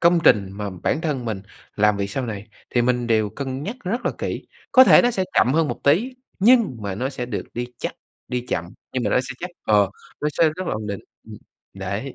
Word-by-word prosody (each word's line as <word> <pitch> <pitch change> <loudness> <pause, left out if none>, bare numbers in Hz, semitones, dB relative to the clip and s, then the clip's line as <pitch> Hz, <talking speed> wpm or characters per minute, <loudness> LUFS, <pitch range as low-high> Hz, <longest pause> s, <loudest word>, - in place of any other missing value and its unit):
công 170 0 +5
trình 100 -2 +5
mà 100 0 -4
bản 150 - +1
thân 145 -7 -2
mình 105 -4 -3 0.3
làm 105 0 +4
việc 100 0 -2
sau 130 +3 -2
này, 105 -2 -5 0.2
thì 120 - +2
mình 125 -1 +1
đều 110 -2 +2
cân 135 +2 -4
nhắc 215 +9 -4
rất 225 +7 -1
là - - +1
kỹ, - - -4 0.3
có 260 -1 +9
thể - - +8
nó 245 - +3
sẽ 190 -5 0
chậm 125 - +4
hơn 160 -2 +3
một - - -4
tí 215 - +3 0.2
nhưng 225 - +5
mà 100 -2 -3
nó 130 +6 -2
sẽ 125 -3 -5
được 115 -4 -3
đi 120 +1 -2
chắc, - - -3 0.3
đi 125 0 -2
chậm, 85 - -1 0.3
nhưng 130 - -1
mà - - +1
nó - - +3
sẽ 130 0 -6
chắc, 180 - -4 0.2
ờ, 105 -3 +4 0.3
nó 150 - +1
sẽ 165 - +6
rất 185 - -4
là - - -1
ổn 105 0 -4
định. 100 -1 -4 0.3
Ừm. - - -8 0.4
Đấy. 100 +7 -4
125 Hz, 240 wpm, -23 LUFS, 105-165 Hz, 0.4 s, có